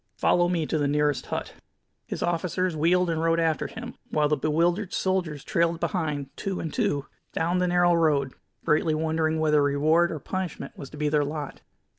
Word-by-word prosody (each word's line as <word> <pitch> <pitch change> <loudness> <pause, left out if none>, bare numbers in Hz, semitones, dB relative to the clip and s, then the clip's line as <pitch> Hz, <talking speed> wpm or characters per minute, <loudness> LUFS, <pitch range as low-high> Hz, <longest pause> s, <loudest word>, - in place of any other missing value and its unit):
Follow 175 0 +3
me 170 -3 0
to 155 - -1
the 145 - +1
nearest 150 0 +1
hut." - - -4 0.5
His - - -3
officers 175 +1 -1
wheeled 175 +4 +3
and 165 -1 -1
rode 165 0 +2
after 160 -2 +1
him, 240 +1 -8 0.2
while 150 -1 +2
the 150 - +2
bewildered 170 +7 0
soldiers 180 -7 -1
trailed 170 +1 +1
behind, 150 -7 -2
two 195 -2 -3
and 160 - -4
two, 145 -1 0 0.3
down 175 +3 0
the 180 - +2
narrow 175 0 +4
road, 150 -5 +2 0.3
greatly 155 +1 +2
wondering 160 0 0
whether 150 -1 +3
reward 155 +4 +3
or 160 - -3
punishment 175 -2 -5
was 140 -9 -9
to 150 - -11
be 150 0 0
their 150 0 +2
lot. 145 0 -5
160 Hz, 185 wpm, -26 LUFS, 150-175 Hz, 0.5 s, narrow